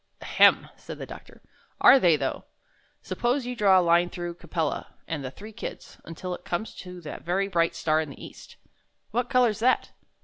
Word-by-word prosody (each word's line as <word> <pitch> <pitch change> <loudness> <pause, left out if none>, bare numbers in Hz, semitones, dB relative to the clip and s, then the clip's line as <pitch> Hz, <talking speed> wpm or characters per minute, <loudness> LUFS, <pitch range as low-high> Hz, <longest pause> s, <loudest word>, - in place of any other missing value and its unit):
"Ahem!" - - +4
said - - -9
the - - -6
doctor, - - -13 0.4
"are 270 - +8
they, 175 -8 +5
though? - - -3 0.6
Suppose 245 +2 -1
you 250 0 -4
draw 195 -4 +5
a 180 - +1
line 170 +1 +4
through 175 -1 -5
Capella 165 -3 -4
and 155 -4 -4
the 130 - -4
three 210 +11 -11
Kids 220 - -8
until 180 +2 -6
it 180 - -8
comes 175 +6 -3
to 180 -1 -9
that 155 -3 -8
very 190 +3 0
bright 170 -3 +1
star 155 0 +1
in 155 - -5
the 140 - -10
east. - - -13 0.6
What 245 +3 -1
color's 245 -5 +3
that?" 255 +3 +2
180 Hz, 190 wpm, -26 LUFS, 165-220 Hz, 0.6 s, are